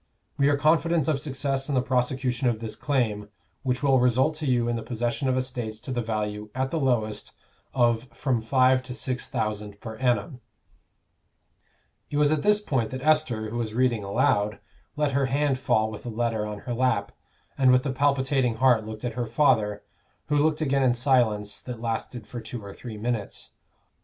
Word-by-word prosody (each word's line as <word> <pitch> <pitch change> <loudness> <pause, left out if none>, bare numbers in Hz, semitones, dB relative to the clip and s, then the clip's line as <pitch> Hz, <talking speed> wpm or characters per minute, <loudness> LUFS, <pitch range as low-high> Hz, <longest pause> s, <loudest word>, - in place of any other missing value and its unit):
We 140 0 +3
are 145 - +2
confident 160 +1 +2
of 145 -4 +1
success 135 -1 -2
in 140 - 0
the 130 - +3
prosecution 125 0 0
of 115 -2 -2
this 110 -1 -5
claim, 115 -6 -1 0.3
which 125 +1 -1
will 135 -2 +4
result 125 +5 +3
to 155 -2 -3
you 120 -2 +2
in 120 - 0
the 115 - -3
possession 120 +3 -2
of 130 - +1
estates 120 -4 -3
to 130 - -7
the 120 -1 -1
value, 105 -1 -3
at 130 0 -1
the 165 - 0
lowest, 110 -6 -1 0.4
of 120 -1 +2
from 120 -1 -1
five 130 +2 +3
to 125 -1 -7
six 130 -1 -3
thousand 105 -1 -3
per 110 0 -8
annum 125 +2 0 1.7
It 145 - -2
was 150 0 +4
at 155 -2 +1
this 210 +3 +4
point 130 - -1
that 130 0 -6
Esther, 150 -9 +1
who 120 - -3
was 110 -2 -3
reading 120 -4 +2
aloud, 100 +1 +1 0.4
let 150 -1 +1
her 135 0 +1
hand 140 0 +1
fall 110 -3 +1
with 105 - -8
the 120 - -6
letter 115 -2 -1
on 105 -1 -6
her 120 - -4
lap, 120 -5 +1 0.4
and 130 -2 +4
with 125 +1 +3
a 135 - 0
palpitating 135 -2 +1
heart 125 -2 +4
looked 110 +2 -7
at 120 - -2
her 120 0 -3
father, 110 -5 +2 0.5
who 150 - +2
looked 150 +1 +2
again 140 -2 +2
in 125 -2 +3
silence 120 -5 +1
that 125 -3 -7
lasted 115 0 -4
for 120 +1 -7
two 110 -1 -7
or 100 - -8
three 115 -4 -8
minutes. 110 -2 -4
125 Hz, 190 wpm, -26 LUFS, 110-135 Hz, 1.7 s, will